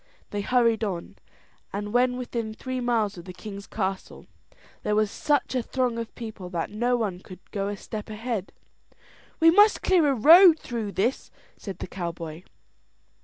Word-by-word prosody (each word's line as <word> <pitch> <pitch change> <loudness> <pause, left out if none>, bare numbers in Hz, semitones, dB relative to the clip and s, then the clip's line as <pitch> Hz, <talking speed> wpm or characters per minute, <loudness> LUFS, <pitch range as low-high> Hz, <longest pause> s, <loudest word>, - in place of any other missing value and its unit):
They 205 - -2
hurried 230 0 +2
on; 185 -5 -4 0.5
and 205 +1 -4
when 250 0 +3
within 230 -3 -4
three 255 +2 -4
miles 225 -6 0
of 170 - -11
the 185 - -8
king's 200 +2 -9
castle 195 -2 -4 0.6
there 210 - 0
was 215 -1 +2
such 290 -3 0
a 255 - +1
throng 245 -1 -1
of 230 -1 -6
people 220 -6 -7
that 170 0 -3
no 240 +4 +1
one 200 -6 -2
could 185 0 -14
go 200 -1 -2
a 205 0 -4
step 215 +2 -7
ahead. 215 -2 -4 0.9
"We 330 0 +7
must 415 +4 +5
clear 355 -5 +4
a 275 - +2
road 330 - +8
through 225 -8 -5
this," 235 +7 -1 0.3
said 195 -4 -8
the - - -6
cowboy. 170 -3 -6
220 Hz, 170 wpm, -26 LUFS, 195-250 Hz, 0.9 s, road